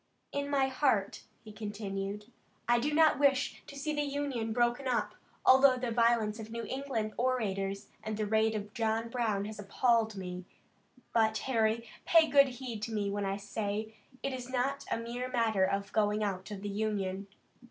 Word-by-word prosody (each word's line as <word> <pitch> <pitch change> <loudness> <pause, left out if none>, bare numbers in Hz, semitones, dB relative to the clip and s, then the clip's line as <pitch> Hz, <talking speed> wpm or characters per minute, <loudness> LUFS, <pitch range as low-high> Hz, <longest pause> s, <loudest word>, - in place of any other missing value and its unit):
"In 285 0 -2
my 275 -2 +3
heart," 260 -7 0 0.2
he 215 - -10
continued, 205 0 -5 0.4
"I 240 0 +4
do 290 +5 0
not 310 -3 +4
wish 280 -1 +2
to 280 - -10
see 305 +2 -2
the 295 - 0
Union 280 -6 -2
broken 240 +3 +1
up, 235 -4 0 0.3
although 265 0 +7
the 250 -2 -2
violence 230 -2 +2
of 220 0 -7
New 230 0 -5
England 260 -6 -3
orators 200 -6 -1 0.2
and 215 -1 -3
the 215 - 0
raid 220 +1 +2
of 210 0 -5
John 225 0 0
Brown 220 -5 0
has 215 0 -7
appalled 220 +2 +2
me. 180 -1 -6 0.7
But, 220 -1 +3
Harry, 230 -2 +1 0.2
pay 330 -1 +5
good 280 -2 +6
heed 245 -4 -6
to 225 - -4
me 205 -2 -1
when 205 0 -2
I 195 0 -1
say 205 +1 -3 0.3
it 275 - -1
is 255 -1 -6
not 265 +2 -1
a - - +1
mere 240 +2 -4
matter 225 -6 +2
of 200 +1 -2
going 210 0 +2
out 195 -1 -3
of 205 -2 -7
the 205 - -3
Union. 200 -2 -2
225 Hz, 180 wpm, -31 LUFS, 205-255 Hz, 0.7 s, although